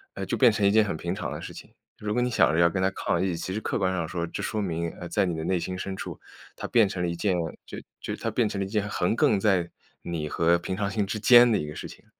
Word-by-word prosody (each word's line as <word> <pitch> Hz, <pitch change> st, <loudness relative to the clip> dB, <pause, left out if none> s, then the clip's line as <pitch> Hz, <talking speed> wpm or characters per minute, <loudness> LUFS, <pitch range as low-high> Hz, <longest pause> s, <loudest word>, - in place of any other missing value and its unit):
呃， -, -, -4 dB
就 -, -, -1 dB
变 125 Hz, -3 st, +6 dB
成 105 Hz, -1 st, 0 dB
一 -, -, +6 dB
件 110 Hz, +1 st, +5 dB
很 100 Hz, -, -2 dB
平 85 Hz, +3 st, -3 dB
常 100 Hz, -, -4 dB
的 -, -, -5 dB
事 -, -, -8 dB
情。 -, -, -12 dB, 0.3 s
如 105 Hz, 0 st, -3 dB
果 125 Hz, -, +1 dB
你 125 Hz, -, +1 dB
想 115 Hz, -, +3 dB
着 80 Hz, -, +2 dB
要 85 Hz, 0 st, +5 dB
跟 95 Hz, +2 st, -2 dB
她 95 Hz, -, +3 dB
抗 85 Hz, -2 st, -1 dB
议， 95 Hz, -2 st, 0 dB
其 85 Hz, +3 st, -5 dB
实 105 Hz, -, -2 dB
客 -, -, -2 dB
观 95 Hz, -1 st, +1 dB
上 85 Hz, -3 st, -2 dB
说， 85 Hz, 0 st, -3 dB
这 85 Hz, -, -5 dB
说 110 Hz, -, -2 dB
明， 85 Hz, -3 st, -2 dB
呃， 85 Hz, -, -7 dB
在 -, -, +2 dB
你 90 Hz, -2 st, -2 dB
的 80 Hz, -, -4 dB
内 90 Hz, +2 st, 0 dB
心 90 Hz, +2 st, -4 dB
深 95 Hz, 0 st, -5 dB
处， -, -, -6 dB, 0.4 s
它 -, -, -7 dB
变 115 Hz, -4 st, +4 dB
成 95 Hz, -2 st, -4 dB
了 90 Hz, -, 0 dB
一 85 Hz, -, -3 dB
件， 95 Hz, +2 st, 0 dB, 0.3 s
就 -, -, -8 dB, 0.2 s
就 -, -, -4 dB
它 115 Hz, -, -3 dB
变 115 Hz, 0 st, +1 dB
成 100 Hz, -1 st, -3 dB
了 -, -, 0 dB
一 -, -, -8 dB
件 105 Hz, -1 st, -1 dB
横 100 Hz, 0 st, 0 dB
亘 105 Hz, -, +4 dB
在 95 Hz, -4 st, +2 dB, 0.3 s
你 80 Hz, -3 st, -3 dB
和 85 Hz, +3 st, +3 dB
平 95 Hz, +2 st, -4 dB
常 100 Hz, -1 st, -1 dB
心 105 Hz, 0 st, -1 dB
之 105 Hz, +2 st, -4 dB
间 120 Hz, +2 st, +7 dB
的 110 Hz, -, +3 dB
一 75 Hz, -, -3 dB
个 75 Hz, -, -7 dB
事 -, -, -6 dB
情。 -, -, -14 dB
95 Hz, 335 characters per minute, -26 LUFS, 85-105 Hz, 0.4 s, 间